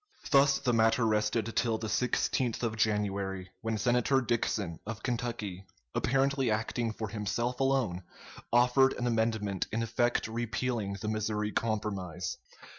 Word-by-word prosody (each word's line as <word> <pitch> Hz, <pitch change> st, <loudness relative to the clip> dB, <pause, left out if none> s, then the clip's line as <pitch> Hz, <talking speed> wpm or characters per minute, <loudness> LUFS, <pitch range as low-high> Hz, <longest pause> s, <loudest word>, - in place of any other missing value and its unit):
] -, -, -12 dB
Thus 140 Hz, 0 st, +6 dB
the 125 Hz, -, 0 dB
matter 115 Hz, +1 st, +3 dB
rested 110 Hz, +1 st, 0 dB
till 115 Hz, -2 st, +2 dB
the 110 Hz, -, -5 dB
16th 125 Hz, +2 st, 0 dB
of 115 Hz, -2 st, 0 dB
January, 100 Hz, -3 st, -1 dB
when 115 Hz, -1 st, -1 dB
Senator 125 Hz, +3 st, +3 dB
Dixon, 110 Hz, -8 st, -1 dB
of 110 Hz, +1 st, -6 dB
Kentucky, 110 Hz, -6 st, -3 dB, 0.3 s
apparently 135 Hz, 0 st, +1 dB
acting 110 Hz, +2 st, -1 dB
for 110 Hz, -1 st, -5 dB
himself 115 Hz, +4 st, -2 dB
alone, 135 Hz, -9 st, +1 dB, 0.5 s
offered 125 Hz, +3 st, +5 dB
an 120 Hz, -, -3 dB
amendment 110 Hz, -4 st, 0 dB
in 115 Hz, +1 st, 0 dB
effect 120 Hz, +1 st, +1 dB
repealing 115 Hz, -2 st, -2 dB
the 105 Hz, -, -4 dB
Missouri 105 Hz, -1 st, -1 dB
Compromise. 105 Hz, -7 st, -2 dB
115 Hz, 135 wpm, -30 LUFS, 105-120 Hz, 0.5 s, Thus